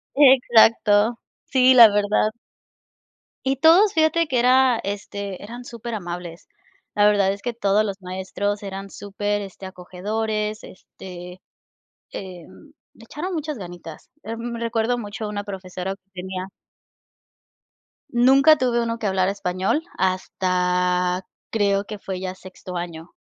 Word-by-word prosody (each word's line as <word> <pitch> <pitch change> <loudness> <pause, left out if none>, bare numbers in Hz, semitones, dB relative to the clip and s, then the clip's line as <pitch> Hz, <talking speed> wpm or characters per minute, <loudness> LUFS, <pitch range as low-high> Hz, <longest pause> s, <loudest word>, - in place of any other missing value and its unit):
Exacto, 230 -5 +5 0.3
sí, 260 -1 +4
la 235 -3 +10
verdad. 205 +1 +1 1.1
Y 270 - +1
todos, 335 +9 +5
fíjate 320 +1 +2
que 260 -4 0
era, 250 -1 +4
este, 200 -1 -5
eran 240 +4 -9
superamables. 180 -8 -7 0.4
La 205 - +3
verdad 200 -2 +3
es 200 - -6
que 240 +1 -3
todos 210 -1 +1
los 200 -2 -3
maestros 190 +3 -3
eran 195 0 -6
super, 205 +1 -3
este, 195 -1 -9
acogedores, 210 +4 -3
este, 180 -1 -11 0.7
em, 185 - -10 0.2
le 230 - -16
echaron 345 +10 -5
muchas 305 -4 -4
ganitas. 175 -4 -10
Em, 230 +2 -5
recuerdo 230 +1 -1
mucho 210 0 -6
a - - -3
una 205 -1 -4
profesora 190 -1 -5
que 195 0 -28
tenía 185 0 -6 1.6
nunca 270 +5 +6
tuve 240 -2 +1
1 230 0 -2
que 225 - -6
hablara 190 0 +1
español, 190 - -1
hasta, 180 0 0 0.3
creo 200 -2 +1
que 210 0 -7
fue 190 -2 -5
ya 185 0 -4
sexto 185 -1 -11
año 170 -1 -6
205 Hz, 130 wpm, -22 LUFS, 185-235 Hz, 1.6 s, la